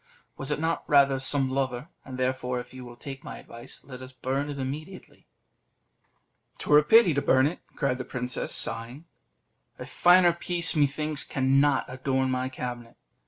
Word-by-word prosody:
"Was 135 - -3
it 150 - 0
not 165 +1 -1
rather 140 -2 +4
some 135 0 +1
lover? 130 0 -2 0.2
And 130 -1 -9
therefore, 125 -1 -2
if 125 +1 -10
you 130 -1 -9
will 120 -1 -11
take 135 +3 -9
my - - -8
advice, 120 +2 -9
let 130 -2 -10
us 130 0 -10
burn 135 +3 -3
it 145 - -6
immediately." 150 +8 -7 1.3
"'Twere 150 0 +4
a - - 0
pity 220 +1 +5
to 140 - 0
burn 130 -1 +3
it," 155 +5 -2 0.2
cried 130 -2 -1
the - - -3
princess, 125 0 -4
sighing; 120 +7 -2 0.7
"a - - -8
finer 175 0 +4
piece, 170 -1 +3
methinks, 150 0 +1
cannot 135 0 +2
adorn 130 0 -1
my 130 0 -2
cabinet." 120 -2 -7
135 Hz, 165 wpm, -26 LUFS, 130-150 Hz, 1.3 s, pity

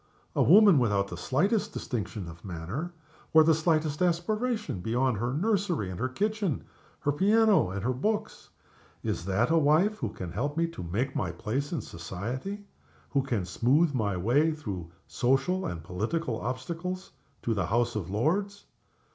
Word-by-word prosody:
A - - +3
woman 195 -2 +7
without 100 -5 +1
the 90 - -5
slightest 180 - 0
distinction 105 -5 -4
of 85 0 -11
manner, 100 - -5 0.4
or 160 - +9
the 160 +1 +5
slightest 155 -1 +1
aspiration 210 - 0
beyond 120 +4 0
her 120 +4 -1
nursery 175 - 0
and 90 - -7
her 130 - 0
kitchen, 205 - -1 0.4
her 145 - +1
piano 205 - +4
and 95 +1 -4
her 125 +2 +1
books. 210 - -2 0.5
Is 85 - -2
that 100 +8 +1
a 165 - +5
wife 160 +8 +3
who 115 - -2
can 90 -4 -7
help 145 - -2
me 165 - +3
to 165 - -8
make 110 +11 -2
my 90 -4 -1
place 120 - -3
in 165 - -1
society? 120 - -5 0.5
who 140 - +2
can 115 -8 -2
smooth 140 - +2
my 105 -7 0
way 140 - +3
through 100 - -6 0.2
social 135 +8 +1
obstacles - - -2
and 85 -2 -7
political 110 - -2
obstacles, 170 +9 -4 0.3
to 115 - +1
the 95 -5 -1
House 120 +3 +1
of 95 -5 -3
Lords? 190 - 0
135 Hz, 165 wpm, -28 LUFS, 100-170 Hz, 0.5 s, or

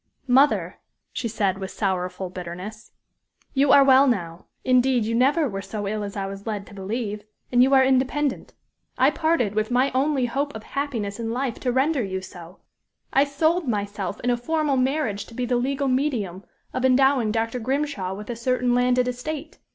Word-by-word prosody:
"Mother," 270 +4 +3 0.3
she 235 - -2
said, 200 -4 -1
with 190 -1 -5
sorrowful 185 -2 -2
bitterness, 185 +4 -8 0.6
"you 275 0 +3
are 280 - +8
well 270 +1 +6
now; 170 -8 -2 0.2
indeed, 255 -2 +3
you 225 - -1
never 280 +6 +3
were 195 -4 -4
so 205 0 -5
ill 210 +1 -2
as 200 0 -6
I 195 - -2
was 195 +2 -8
led 205 -2 -3
to 205 - -15
believe; 205 +1 -4 0.3
and 245 0 +4
you 270 +2 +5
are 265 - +6
independent. 265 +2 0 0.4
I - - +4
parted 315 -11 +1
with 215 0 0
my 255 +3 +2
only 270 0 +1
hope 275 +3 -2
of 220 - -7
happiness 235 -8 -3
in 225 -1 -3
life 250 0 -2
to 250 - -1
render 270 +3 +2
you 190 -1 -3
so; 180 -1 -11 0.6
I 275 +1 +5
sold 315 +3 +1
myself 205 -3 -3
in 245 - +1
a 240 - +1
formal 300 +2 0
marriage 255 -6 0
to 230 - -13
be 250 - -1
the 245 0 +1
legal 275 +3 -1
medium 245 -9 -1 0.3
of 255 - -2
endowing 260 -3 +4
Dr. 230 +2 -1
Grimshaw 255 -7 -2
with 210 +4 -7
a - - -4
certain 250 +1 0
landed 250 0 +2
estate. 295 +5 -5
245 Hz, 185 wpm, -24 LUFS, 205-270 Hz, 0.6 s, are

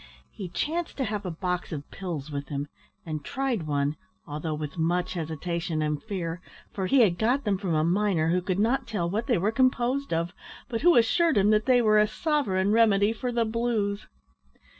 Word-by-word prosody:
He 190 -3 -7
chanced 330 - -2
to 270 - 0
have 210 -4 -3
a - - -2
box 180 +2 -3
of 145 -3 -5
pills 160 -6 -5
with 140 -1 -4
him, 145 0 -3 0.4
and 155 -3 -4
tried 250 - -2
one, 145 0 0 0.3
although 155 +1 -4
with 150 -2 -5
much 175 +3 0
hesitation 165 0 -3
and 150 -1 -1
fear, 180 -5 -4 0.3
for 190 -2 -2
he 270 +6 +5
had 180 -6 +3
got 250 +6 +2
them 200 -3 0
from 185 -5 -1
a 155 - +2
miner 175 -2 +2
who 180 +1 +2
could 185 0 -2
not 230 +6 +1
tell 190 -6 -1
what 215 +6 -2
they 240 - +3
were 200 +5 +1
composed 255 +2 +1
of, 170 +1 -1 0.3
but 230 -4 -3
who 350 0 +6
assured 290 +5 +3
him 200 +2 +4
they 240 +3 +4
were 215 -1 +5
a 210 - +4
sovereign 215 - 0
remedy 215 -2 +4
for 245 +2 -3
the 235 -1 +1
blues! 220 -3 -1
195 Hz, 195 wpm, -27 LUFS, 165-230 Hz, 0.4 s, who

